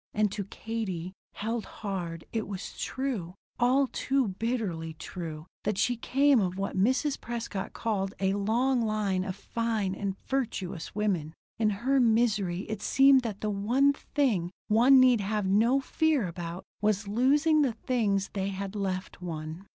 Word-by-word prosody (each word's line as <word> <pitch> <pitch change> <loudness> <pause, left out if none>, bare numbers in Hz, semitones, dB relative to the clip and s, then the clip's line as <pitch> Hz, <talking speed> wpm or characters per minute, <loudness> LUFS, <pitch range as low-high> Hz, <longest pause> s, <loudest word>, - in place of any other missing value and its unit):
And 210 -1 +2
to 200 -2 -4
Katie, 190 -5 -4 0.2
held 225 +2 -3
hard, 175 -5 -5
it 225 -2 -1
was 195 -2 -6
true, 230 -10 -3 0.2
all 255 +3 +4
too 265 -2 0
bitterly 190 -7 -3
true, 160 -2 -7 0.2
that 210 -2 -1
she 245 +4 +2
came 275 +3 +3
of 185 -2 -1
what 195 0 -3
Mrs. 260 +9 +1
Prescott 230 -4 -4
called 200 -4 -2
a 190 0 +1
long 235 +6 +1
line 210 -4 0
of 185 -1 -4
fine 220 -2 -2
and 195 -1 -3
virtuous 200 -10 -3
women. 180 -7 -1 0.2
In 215 -2 +3 0.2
her 270 +1 +4
misery 215 -6 +2
it 215 0 -5
seemed 270 +2 +5
that 220 -5 -5
the 215 - -1
one 245 +8 +3
thing 240 - 0 0.2
one 245 +5 +7
need 250 -4 +5
have 210 0 -1
no 225 +8 +4
fear 295 - +1
about 170 +1 -6 0.2
was 210 -1 +1
losing 290 +8 +3
the 265 -5 +2
things 210 -6 0
they 195 -1 -1
had 195 +1 -5
left 190 -2 -3
one. 165 +2 -6
210 Hz, 155 wpm, -29 LUFS, 190-245 Hz, 0.2 s, one